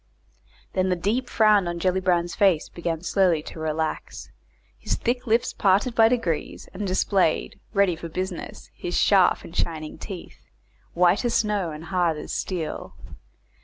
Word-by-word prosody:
Then 185 0 +1
the 180 - +2
deep 220 +8 -1
frown 210 -4 +4
on 175 0 -3
Gellibrand's 180 -1 +1
face 190 -6 +2
began 170 -1 -4
slowly 180 -4 +2
to 160 - -9
relax, 160 0 -3 0.5
his - - -1
thick 245 +1 -2
lips 230 +2 +2
parted 200 +5 +2
by 225 -1 +5
degrees, 180 -11 -2
and 200 +1 -4
displayed, 185 -2 +1
ready 200 -4 +3
for 165 +1 -8
business, 185 +1 -6
his 175 - -3
sharp 195 -3 +4
and 165 - -11
shining 155 -3 -3
teeth, 190 -4 -9 0.5
white 180 +4 +3
as 240 - 0
snow 205 -5 +1
and 155 0 -8
hard 175 -2 0
as - - -6
steel. 165 -5 -4
185 Hz, 150 wpm, -24 LUFS, 170-205 Hz, 0.5 s, by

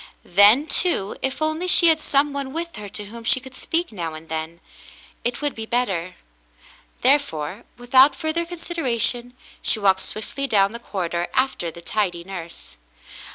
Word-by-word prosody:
Then, 205 +10 +6
too, 320 - 0
if 265 +3 -2
only 315 +3 -1
she 345 -1 +7
had 320 -1 +3
some 285 -1 +1
one 275 -1 -4
with 335 +1 -4
her 205 -1 -7
to 205 - -4
whom 230 +3 -10
she 245 - +5
could 260 0 -13
speak 330 +5 -2
now 170 -6 -5
and 160 +1 -12
then, 160 +1 -4 0.6
it 240 +3 -2
would 290 - 0
be 220 0 -7
better. 190 -8 -1 0.9
There 275 +4 +6
fore, 180 - -6
without 260 +3 +5
further 315 +4 -1
consideration, 255 -8 -2 0.3
she - - +2
walked 195 -2 +3
swiftly 245 +8 -5
down 200 -4 +3
the 235 - -7
corridor 175 -6 -3
after 260 -10 0
the 170 +1 -11
tidy 180 -4 -1
nurse. 175 - -9
235 Hz, 165 wpm, -22 LUFS, 190-280 Hz, 0.9 s, she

